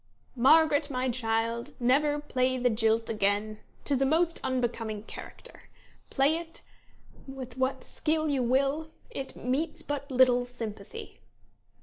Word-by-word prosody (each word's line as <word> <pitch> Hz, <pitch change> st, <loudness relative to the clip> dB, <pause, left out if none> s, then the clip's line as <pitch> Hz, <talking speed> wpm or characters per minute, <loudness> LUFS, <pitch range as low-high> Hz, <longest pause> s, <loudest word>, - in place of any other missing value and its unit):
"'Margaret, 290 Hz, +3 st, +5 dB
my 255 Hz, -1 st, -1 dB
child, 230 Hz, -1 st, -1 dB
never 290 Hz, +4 st, +3 dB
play 255 Hz, -3 st, 0 dB
the 245 Hz, -1 st, +2 dB
jilt 225 Hz, 0 st, +2 dB
again; 210 Hz, 0 st, 0 dB, 0.3 s
'tis 275 Hz, -2 st, +2 dB
a -, -, +4 dB
most 330 Hz, +3 st, +2 dB
unbecoming 230 Hz, -4 st, -2 dB
character. -, -, -11 dB, 0.4 s
Play 285 Hz, +4 st, +3 dB
it 335 Hz, -1 st, -7 dB, 0.6 s
with 260 Hz, -2 st, -8 dB
what 260 Hz, 0 st, -1 dB
skill 315 Hz, 0 st, 0 dB
you 280 Hz, -3 st, +1 dB
will, 275 Hz, +6 st, +1 dB, 0.2 s
it 270 Hz, -, -6 dB
meets 270 Hz, +6 st, -2 dB
but 290 Hz, 0 st, -4 dB
little 250 Hz, -1 st, +4 dB
sympathy.' 245 Hz, -, -8 dB
260 Hz, 125 wpm, -29 LUFS, 235-290 Hz, 0.6 s, Margaret